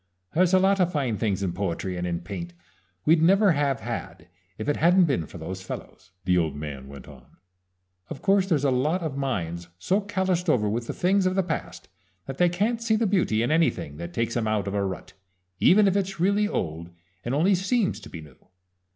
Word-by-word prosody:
"There's 180 +1 +3
a 190 - +6
lot 195 +1 +3
of 180 -1 +2
fine 130 -9 -1
things 100 -3 -1
in 90 -3 -1
poetry 95 0 -3
and 90 0 -3
in 85 -1 -2
paint 85 -2 -7 0.5
we'd 160 +1 +4
never 195 +4 +5
have 140 -4 0
had - - -6 0.3
if - - -5
it 145 - +1
hadn't 175 +3 +5
been 130 - -1
for - - -11
those 95 +3 -6
fellows," 95 0 -9 0.2
the 90 0 +3
old 80 -3 -1
man 70 -3 -7
went 70 -2 -11
on. 65 -4 -16 0.7
"Of 155 - -6
course 195 -1 +3
there's 150 -5 +2
a 140 - +3
lot 150 +8 0
of 155 -4 -3
minds 85 -11 -3
so 190 - 0
calloused 190 -3 -1
over 110 -8 +2
with 115 +3 -2
the - - -3
things 190 +1 +2
of 185 - -1
the 190 - +2
past 90 - -5 0.4
that 135 - -7
they 175 -1 +5
can't 215 +7 -1
see 230 -1 +2
the 225 +1 +1
beauty 180 - +1
in 120 - 0
anything 90 - +1
that 85 +1 -6
takes 115 +5 -2
'em 115 -2 0
out 105 -2 0
of 100 - -3
a 100 -1 0
rut, 95 -2 -5 0.5
even 205 +2 +5
if 195 - +2
it's 195 -2 -1
really 200 +4 +2
old 85 - -3 0.3
and 120 +3 -2
only 175 +7 +3
seems 195 +3 0
to - - -12
be 80 - -8
new. 75 -4 -17
135 Hz, 220 wpm, -25 LUFS, -, 0.7 s, a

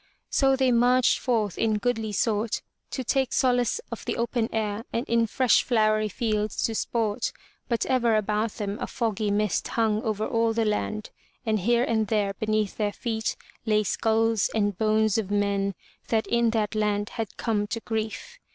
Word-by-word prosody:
So 270 -1 +4
they 260 -1 +2
marched 245 +1 +4
forth 220 -6 0
in 220 -2 +2
goodly 225 -1 -1
sort 210 +1 0 0.3
to 260 - -3
take 265 +1 +1
solace 245 - +2
of - - -6
the - - -2
open 235 -1 0
air 215 0 -2
and 235 - -2
in 230 -1 +2
fresh 250 +2 +3
flowery 215 -3 +2
fields 215 0 -1
to 225 - 0
sport, 220 -1 -1 0.4
but 235 -2 0
ever 240 -3 +2
about 215 +1 0
them 205 0 -4
a - - -2
foggy 220 -3 -1
mist 210 0 0
hung 220 -2 +1
over 215 -1 -1
all 230 0 +1
the 225 0 +1
land, 215 0 -2 0.3
and 215 -1 +1
here 235 +5 +2
and 220 -3 +1
there 205 -2 +1
beneath 215 0 -1
their 210 -2 0
feet 220 -2 -2 0.3
lay 215 -1 +3
skulls 225 0 +1
and 205 -2 +1
bones 220 +1 +2
of 205 -3 -3
men 200 -1 0 0.3
that 220 -1 +1
in 235 -1 +2
that 220 -2 0
land 210 -1 0
had 225 -4 -5
come 210 -3 0
to 230 +1 -3
grief. 220 - -4
220 Hz, 175 wpm, -26 LUFS, 210-230 Hz, 0.4 s, So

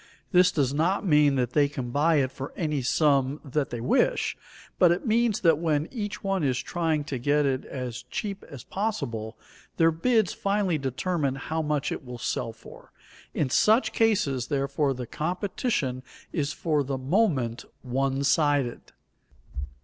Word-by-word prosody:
This 180 -1 +5
does 140 -5 0
not 170 +8 +1
mean 150 -4 +4
that 125 -2 -1
they 145 -2 +3
can 125 -4 -5
buy 155 +5 +3
it 135 -3 +2
for 135 +1 -7
any 150 -5 -1
sum 140 +1 +2
that 140 +1 -1
they 120 - -5
wish, 115 - +1 0.4
but 175 -2 +6
it 175 - -1
means 225 -1 +2
that 165 -4 +4
when 155 -2 0
each 210 -4 -5
one 195 -3 0
is 130 -3 +1
trying 160 +1 -1
to 140 -3 -4
get 145 +3 +2
it 135 -1 -1
as 125 -2 -5
cheap 200 -2 -4
as 140 -6 -9
possible, 125 - -3 0.4
their 165 -1 +5
bids 220 +5 +2
finally 195 -5 0
determine 140 +2 -1
how 160 +4 -3
much 150 -2 -1
it - - -4
will 125 -1 -8
sell 115 0 -2
for. 115 - -15 0.4
In 135 -4 0
such 220 - +3
cases, 145 - +1
therefore, 140 -1 0
the 125 0 -5
competition 170 - -2 0.3
is 145 -2 -1
for 150 -1 0
the 135 0 -3
moment 130 - 0 0.2
one 135 +2 -1
sided. 145 -4 +2
145 Hz, 160 wpm, -26 LUFS, 130-175 Hz, 0.4 s, but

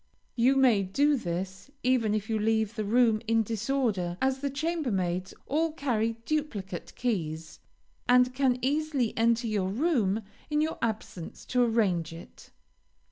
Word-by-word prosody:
You 255 +3 +4
may 250 -7 +5
do 285 +11 +2
this, 190 0 -4
even 240 -4 +2
if 215 0 -2
you 220 -1 0
leave 220 0 +1
the 215 - -2
room 225 0 +3
in 225 0 +3
disorder, 220 -5 -1
as 265 0 +1
the 280 +1 -1
chambermaids 245 - -1
all 315 +2 0
carry 230 -7 0
duplicate 210 - -3
keys, 165 -9 -3 0.5
and 250 0 +5
can 255 -2 +2
easily 285 -3 0
enter 230 +1 +2
your 205 -4 0
room 225 - +1 0.3
in 300 0 +1
your 315 +1 -1
absence 215 -6 -4
to 250 - +4
arrange 195 -9 +1
it. 165 - -13
230 Hz, 140 wpm, -28 LUFS, 200-265 Hz, 0.5 s, may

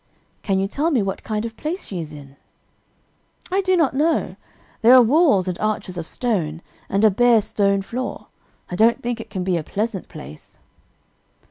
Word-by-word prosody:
"Can 195 -2 0
you 195 - +1
tell 290 +10 -1
me 255 -10 +2
what 195 -1 -3
kind 215 0 -2
of 225 -1 -6
place 335 +9 -4
she 185 - -5
is 155 -2 -6
in?" 140 -2 -12 1.2
"I 385 +2 +2
do 370 -1 +2
not 310 -7 +2
know. 310 +5 0 0.5
There 240 +2 +7
are 255 - +9
walls 240 - +3
and 180 -1 -3
arches 215 -4 -2
of 170 -2 -5
stone, 175 -10 -2 0.3
and 200 +3 +2
a 215 - +6
bare 240 +3 +4
stone 200 -1 0
floor. 250 +6 -5 0.5
I - - -2
don't 225 +5 +3
think 240 -1 -2
it 225 - -12
can 190 -3 -4
be 180 -1 0
a 160 - -3
pleasant 205 +2 -3
place." 75 +4 -12
215 Hz, 190 wpm, -21 LUFS, 185-245 Hz, 1.2 s, are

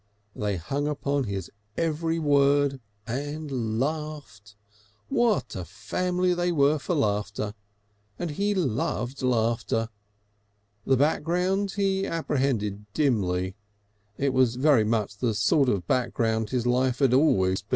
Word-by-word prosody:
They 105 -2 -1
hung 140 - -2
upon 140 -2 -1
his 100 -3 -4 0.3
every 165 0 0
word 140 -2 +3 0.2
and 135 -3 -3
laughed. 145 -8 -4 0.5
What 215 - +1
a 95 - -4
family 180 - -1
they 175 0 0
were 150 -1 +3
for 175 - -2
laughter! 105 -4 -1 0.6
And 175 - -3
he 200 +7 0
loved 130 - -1
laughter. 115 -2 0 1.0
The 135 - +4
background 180 +7 +1
he 195 -1 0
apprehended 115 -10 -1
dimly; 95 -10 +1 0.6
it 140 -1 0
was 130 -2 +3
very 135 -3 +4
much 105 -2 -1
the 115 -4 0
sort 135 +5 +3
of 95 -7 0
background 115 -2 0
his 125 0 -1
life 125 0 +2
had 135 -3 +3
always 95 -10 +3
had. - - -16
130 Hz, 125 wpm, -26 LUFS, 110-155 Hz, 1.0 s, The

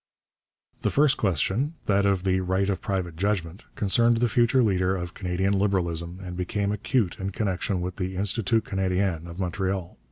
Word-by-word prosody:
The - - +1
first 150 0 +4
question, 105 - 0
that 100 0 +3
of 95 -2 +1
the 95 -1 +2
right 95 +1 0
of 95 - -3
private 90 -4 -2
judgment, 95 0 -1
concerned 115 +3 +3
the 120 +1 +2
future 120 +2 +3
leader 95 -3 +2
of 90 -1 -5
Canadian 95 +1 -1
Liberalism 90 -3 0
and 90 -1 -6
became 100 +3 -1
acute 105 -1 0
in 95 0 -2
connection 95 -2 -1
with 90 0 -4
the 95 -1 -3
Institut 105 +3 +1
Canadien 95 -3 -1
of 85 +2 -9
Montreal. 95 0 -2
95 Hz, 165 wpm, -26 LUFS, 90-105 Hz, -, first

